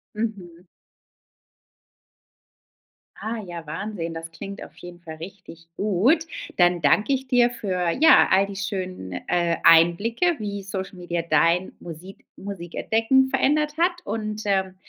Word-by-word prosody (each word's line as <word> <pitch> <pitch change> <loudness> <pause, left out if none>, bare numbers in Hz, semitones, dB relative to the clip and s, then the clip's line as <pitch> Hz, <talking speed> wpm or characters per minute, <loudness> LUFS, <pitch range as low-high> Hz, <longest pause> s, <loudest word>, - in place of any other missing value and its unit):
Mhm. 190 -6 -5 2.5
Ah, 225 +1 -4
ja, 170 -2 -8
Wahnsinn, 170 +1 -5
das 165 0 -7
klingt 195 +5 -8
auf - - -11
jeden 175 0 -11
Fall 160 -2 -9
richtig 165 -1 -11
gut. 225 - +2 0.3
Dann 175 -1 +3
danke 210 - +3
ich 265 0 -2
dir 245 -1 +4
für, 185 -7 -2
ja, 310 - +6
all 195 +1 +4
die 200 0 -8
schönen, 185 - -4
äh, 170 -1 +1
Einblicke, 200 - +4
wie 205 -2 -4
Social 190 0 -6
Media 175 -1 -3
dein 170 +3 +2
Musik 175 +3 -11
Musikentdecken 220 +7 0
verändert 295 +3 +1
hat 350 +2 +3
und, 215 -1 -4
ähm, 190 -2 0
190 Hz, 130 wpm, -24 LUFS, 170-225 Hz, 2.5 s, ja